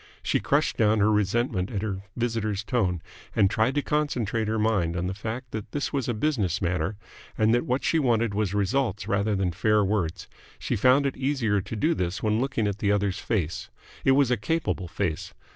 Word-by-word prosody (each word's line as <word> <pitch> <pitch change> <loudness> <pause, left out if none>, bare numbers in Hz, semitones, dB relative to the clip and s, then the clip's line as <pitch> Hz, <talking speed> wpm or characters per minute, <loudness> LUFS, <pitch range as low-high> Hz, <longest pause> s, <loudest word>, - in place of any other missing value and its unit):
She - - +1
crushed - - +1
down 110 0 +3
her 105 +1 +3
resentment 105 -1 +1
at 105 -4 -3
her 95 -3 -3 0.2
visitor's 110 -4 -1
tone, 95 -8 0 0.3
and 95 -1 +4
tried 120 +5 +1
to 145 - +1
concentrate 120 -7 0
her 110 +1 0
mind 100 -6 +1
on 90 - -1
the 95 - -2
fact 115 +5 -6
that 110 -2 -6
this 145 - -2
was 135 -4 -1
a 120 - 0
business 105 - 0
matter 90 +2 -1 0.4
and 110 +1 +3
that 120 - +1
what 125 +2 0
she 165 - +2
wanted 115 -6 +2
was 105 -1 -1
results 105 0 0
rather 100 0 +1
than 95 -2 0
fair 105 +4 +2
words. 95 -5 -1 0.3
She - - -2
found 130 +6 +4
it 140 - -1
easier 130 -7 +1
to 115 - -6
do 155 +10 +2
this 90 - -3
when 110 +1 +2
looking 135 -5 0
at 100 -1 -2
the 100 0 +1
other's 100 -2 0
face. 90 -8 -2 0.3
It 135 - +5
was 135 -2 +3
a 125 - +3
capable 105 - -1
face. 85 -1 -3
110 Hz, 205 wpm, -26 LUFS, 100-120 Hz, 0.4 s, It